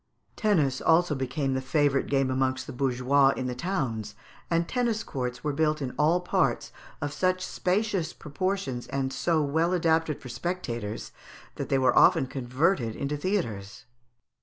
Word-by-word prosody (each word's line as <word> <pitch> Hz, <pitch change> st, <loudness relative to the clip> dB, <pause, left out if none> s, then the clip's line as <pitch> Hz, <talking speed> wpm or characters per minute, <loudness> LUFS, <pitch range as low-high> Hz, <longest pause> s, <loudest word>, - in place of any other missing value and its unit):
] -, -, -45 dB
Tennis 155 Hz, -, +1 dB
also 165 Hz, 0 st, +3 dB
became 135 Hz, +1 st, -1 dB
the 130 Hz, -, -1 dB
favourite 140 Hz, 0 st, +1 dB
game 135 Hz, -2 st, +1 dB
amongst 130 Hz, 0 st, 0 dB
the 140 Hz, -, -8 dB
bourgeois 135 Hz, +2 st, +3 dB
in 130 Hz, -, -2 dB
the 125 Hz, -, -2 dB
towns, 125 Hz, -, -3 dB, 0.3 s
and 170 Hz, 0 st, +1 dB
tennis 235 Hz, -3 st, 0 dB
courts 125 Hz, -2 st, -4 dB
were 150 Hz, -, -1 dB
built 155 Hz, +1 st, +1 dB
in 130 Hz, -3 st, -4 dB
all 160 Hz, +4 st, +3 dB
parts, 180 Hz, -, 0 dB, 0.3 s
of 145 Hz, 0 st, -3 dB
such 185 Hz, 0 st, 0 dB
spacious 185 Hz, -3 st, 0 dB
proportions 155 Hz, -6 st, -3 dB
and 135 Hz, -1 st, -2 dB
so 160 Hz, 0 st, +1 dB
well 160 Hz, +5 st, +1 dB
adapted 160 Hz, -3 st, +1 dB
for 125 Hz, -, -10 dB
spectators, 120 Hz, -, -4 dB, 0.5 s
that -, -, -4 dB
they 135 Hz, -, +3 dB
were 130 Hz, -1 st, +3 dB
often 165 Hz, -6 st, +6 dB
converted 130 Hz, -, 0 dB
into 140 Hz, +1 st, -2 dB
theatres. 145 Hz, -, -3 dB
145 Hz, 160 wpm, -27 LUFS, 130-170 Hz, 0.5 s, often